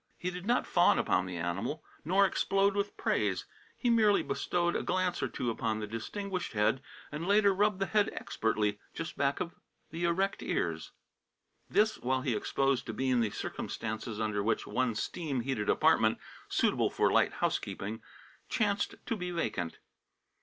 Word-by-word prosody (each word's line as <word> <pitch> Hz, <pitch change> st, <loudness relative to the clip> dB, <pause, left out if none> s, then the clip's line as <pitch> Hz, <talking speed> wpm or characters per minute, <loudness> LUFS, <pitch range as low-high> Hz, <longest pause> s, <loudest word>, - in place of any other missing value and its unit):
He 180 Hz, -, -3 dB
did 180 Hz, +2 st, -7 dB
not 245 Hz, +1 st, +2 dB
fawn -, -, +4 dB
upon 95 Hz, -, +1 dB
the 90 Hz, -1 st, -5 dB
animal 95 Hz, -, -2 dB, 0.2 s
nor 190 Hz, +5 st, +4 dB
explode 195 Hz, +1 st, +2 dB
with 200 Hz, 0 st, -2 dB
praise. -, -, 0 dB, 0.3 s
He 245 Hz, -, -1 dB
merely 215 Hz, -3 st, +4 dB
bestowed 175 Hz, -1 st, 0 dB
a -, -, +1 dB
glance 185 Hz, -1 st, 0 dB
or -, -, +1 dB
two 120 Hz, -, -2 dB
upon 110 Hz, -1 st, -1 dB
the 110 Hz, -, -3 dB
distinguished 180 Hz, -, -4 dB
head, 105 Hz, +5 st, +2 dB, 0.3 s
and 155 Hz, +4 st, -4 dB
later 200 Hz, 0 st, +5 dB
rubbed 205 Hz, +1 st, +2 dB
the 195 Hz, -, 0 dB
head 210 Hz, +1 st, +2 dB
expertly 105 Hz, -2 st, -1 dB, 0.2 s
just 165 Hz, -, -5 dB
back 140 Hz, 0 st, +1 dB
of 170 Hz, -, -3 dB, 0.4 s
the 170 Hz, +2 st, -2 dB
erect 190 Hz, +4 st, +1 dB
ears; -, -, -1 dB, 0.8 s
this, 215 Hz, +1 st, +3 dB
while 130 Hz, +1 st, 0 dB
he 130 Hz, -3 st, 0 dB
exposed 135 Hz, +2 st, 0 dB
to -, -, -3 dB
Bean 130 Hz, -2 st, +1 dB
the 115 Hz, -2 st, +2 dB
circumstances 110 Hz, +2 st, -4 dB
under 105 Hz, -2 st, 0 dB
which 110 Hz, +3 st, 0 dB
one 130 Hz, -3 st, 0 dB
steam 140 Hz, +2 st, -2 dB
heated 115 Hz, -5 st, -2 dB
apartment, -, -, +4 dB, 0.3 s
suitable -, -, +2 dB
for -, -, +2 dB
light -, -, +3 dB
housekeeping, 105 Hz, +3 st, -2 dB, 0.5 s
chanced 205 Hz, -2 st, 0 dB
to 230 Hz, -, -1 dB
be 180 Hz, -3 st, -4 dB
vacant. 90 Hz, -, -2 dB
150 Hz, 165 wpm, -31 LUFS, -, 0.8 s, later